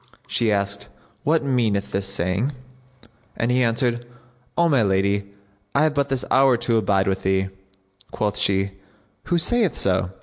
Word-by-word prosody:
She 115 -2 +1
asked, 100 0 -1 0.4
"What 155 +1 +2
meaneth 115 -7 0
this 95 0 -2
saying?"; 100 - -1 0.8
and 120 +1 +1
he 125 +1 +2
answered, 120 0 +1 0.5
"O 170 - +4
my 140 -6 +3
lady, 100 0 0 0.4
I 140 - +4
have 155 -1 +2
but 140 -1 0
this 135 -2 -1
hour 130 -2 +5
to 115 -1 +1
abide 95 -2 +2
with 95 -1 0
thee." 95 0 +1 0.6
Quoth 105 -1 -2
she 100 0 +1 0.5
"Who 175 - +1
saith 210 +2 +1
so?" 95 -1 +1
110 Hz, 155 wpm, -23 LUFS, 100-135 Hz, 0.8 s, hour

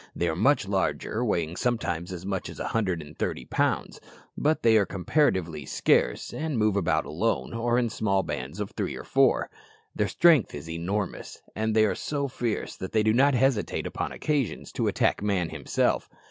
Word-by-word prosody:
They 85 - 0
are 80 - 0
much 120 - +3
larger, 100 +3 -1
weighing 85 -7 -1
sometimes 95 -7 -1
as 90 0 -7
much 95 -1 -3
as - - -10
a - - -3
hundred 95 -8 -1
and 75 +1 -13
thirty - - -2
pounds; - - -1 0.3
but 155 +2 +1
they 115 -1 +5
are 100 - +3
comparatively 95 - 0
scarce, - - +1
and 155 -4 -2
move 105 -2 +2
about 100 -4 +1
alone, 110 +11 -1
or 120 +1 +1
in 125 -1 +2
small 100 -3 +1
bands 75 +5 -5
of 105 - -3
three - - -3
or - - -7
four. - - +2 0.4
Their 105 - +1
strength 155 - +4
is 75 +2 -8
enormous, 90 +5 -4
and 110 +1 -1
they 110 -1 +5
are 105 - +1
so 140 -2 -2
fierce 120 -4 -3
that 95 - -6
they 110 -1 +3
do 110 0 +3
not 135 +3 +4
hesitate, 125 -3 +1
upon - - -3
occasions, 145 -8 -2
to - - -1
attack - - +1
man 100 -5 0
himself. - - 0
105 Hz, 190 wpm, -27 LUFS, 90-120 Hz, 0.4 s, they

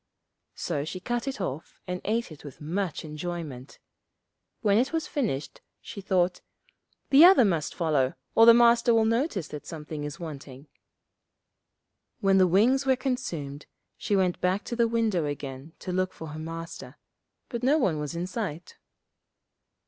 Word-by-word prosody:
So 150 -5 -2
she 175 +5 -5
cut 240 +6 -3
it 270 - -3
off 160 -5 -5
and 180 0 -4
ate 225 -2 -1
it 155 - -12
with 145 -4 -11
much 170 +3 -3
enjoyment. 150 -4 -6 0.8
When 205 -1 +3
it 255 - +1
was 325 -1 -1
finished, 210 - -3 0.2
she 210 -4 -9
thought, 185 -2 +1 0.7
'The 285 +3 +8
other 360 -9 +8
must 165 -6 -1
follow, 150 -7 +1 0.2
or 225 +1 +6
the 235 - +11
Master 235 0 +5
will 225 -1 +4
notice 230 - 0
that 150 -1 -8
something 150 -2 -6
is 145 -1 -6
wanting.' 140 -4 -8 1.5
When 195 -3 +3
the 185 - +5
wings 230 +10 +3
were 265 -1 +3
consumed 165 - -4 0.3
she 205 - -1
went 185 -2 +1
back 185 +3 +1
to 235 - -5
the 235 -1 +3
window 225 -8 +1
again 140 +1 -6
to 185 - -4
look 185 +1 -1
for 160 - -8
her 155 +1 -7
Master, 165 -4 -7 0.5
but 235 -2 -4
no 275 +5 +3
one 185 - +1
was 150 +2 -4
in 170 +1 -2
sight. 180 -5 -5
180 Hz, 160 wpm, -27 LUFS, 155-230 Hz, 1.5 s, the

